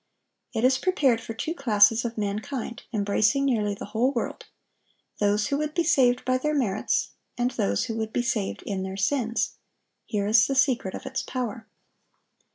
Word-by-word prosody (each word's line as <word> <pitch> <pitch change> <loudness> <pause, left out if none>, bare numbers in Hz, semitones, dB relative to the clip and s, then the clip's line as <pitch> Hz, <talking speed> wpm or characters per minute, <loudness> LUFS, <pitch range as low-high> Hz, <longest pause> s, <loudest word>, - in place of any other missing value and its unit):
It 225 -3 -2
is 260 +1 +4
prepared 270 -9 +2
for 225 - -7
two 310 +8 -3
classes 225 -6 +4
of 235 -1 -4
mankind, 215 +4 -3
embracing 215 +5 +2
nearly 210 -6 +1
the - - -7
whole 245 +4 +2
world,—those 210 -3 -4
who 280 0 0
would 305 0 -3
be 340 - +2
saved 255 -6 +3
by 255 0 +2
their 300 +3 0
merits, 215 -8 0 0.3
and 245 +1 +1
those 100 - 0
who 225 - -4
would 220 -1 -3
be 240 - 0
saved 215 -5 -2
in 195 -2 -3
their 190 0 -5
sins. 230 +2 0 0.5
Here 205 -2 -1
is 215 +1 +5
the 275 - -1
secret 260 -8 +2
of - - -8
its - - -3
power. 235 -3 -4
230 Hz, 170 wpm, -26 LUFS, 210-260 Hz, 0.5 s, is